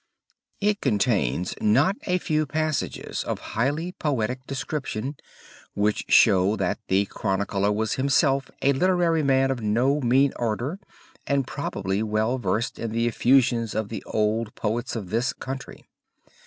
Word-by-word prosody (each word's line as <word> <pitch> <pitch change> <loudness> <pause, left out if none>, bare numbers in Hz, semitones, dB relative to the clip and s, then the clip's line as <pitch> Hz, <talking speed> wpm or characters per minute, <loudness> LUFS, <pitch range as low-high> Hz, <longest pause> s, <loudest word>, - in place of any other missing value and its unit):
It 205 0 +1
contains 100 - +1
not 135 - +3
a 180 -1 +2
few 155 -3 0
passages 155 +1 -2
of - - -3 0.2
highly 145 +10 0
poetic 130 -5 -2
description 135 -1 -4 0.6
which 105 +1 0
show 100 -1 +5
that 95 -4 -1
the 95 +2 +2
chronicler 100 0 -1
was 110 +1 0
himself 135 0 +2
a 140 - +4
literary 175 +1 +2
man 135 -1 +3
of 125 -3 -3
no 125 +7 +1
mean 130 +3 +3
order 120 - -2 0.5
and 140 -2 +1
probably 100 -8 -3
well 110 +4 0
versed 110 +2 -1
in 115 - -3
the 115 +1 0
effusions 120 -1 +2
of 110 -1 -2
the 110 - -5
old 110 +1 0
poets 115 +4 -2
of 100 -6 -5
this 120 +3 0
country. 135 0 -7
120 Hz, 140 wpm, -25 LUFS, 105-140 Hz, 0.6 s, show